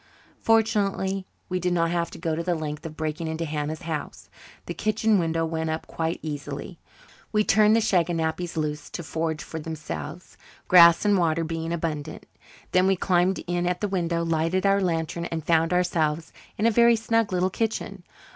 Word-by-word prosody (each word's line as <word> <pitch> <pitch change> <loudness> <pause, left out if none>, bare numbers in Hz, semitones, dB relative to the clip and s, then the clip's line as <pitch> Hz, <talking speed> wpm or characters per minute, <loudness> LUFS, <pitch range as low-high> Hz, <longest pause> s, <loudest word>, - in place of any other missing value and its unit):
Fortunately 200 -4 +1 0.2
we 185 0 -2
did 180 0 0
not 165 -1 +1
have 170 -1 0
to - - -10
go 165 -2 -2
to 165 - -2
the 175 0 0
length 150 -2 -5
of 155 - -11
breaking 155 +1 -3
into 160 +1 -3
Hannah's 155 +2 -3
house. 160 -3 -5 0.3
The - - -4
kitchen 215 -1 +1
window 165 -1 0
went 160 0 -2
up 160 0 -3
quite 165 +1 -2
easily. 145 +2 -6 0.5
We 210 -1 +3
turned 215 +1 +4
the 230 - +3
shaganappies 170 -3 0
loose 150 -1 -3
to 170 - -6
forage 160 -1 -3
for 160 - -6
themselves, 160 +1 -7 0.3
grass 170 0 +7
and 205 -2 +4
water 165 -1 +1
being 165 0 -3
abundant. 160 -3 -4 0.5
Then 185 +1 +4
we 195 - +3
climbed 180 0 +1
in 175 0 -1
at 180 0 -1
the 210 - -1
window, 170 -3 -1
lighted 165 +3 0
our 200 0 +4
lantern, 170 -1 -1
and 165 -2 -4
found 165 0 +2
ourselves 165 -3 0 0.2
in 210 - 0
a 230 - +5
very 235 +1 +5
snug 225 -1 0
little 185 +1 +1
kitchen. 225 +2 -3
170 Hz, 180 wpm, -25 LUFS, 160-190 Hz, 0.5 s, grass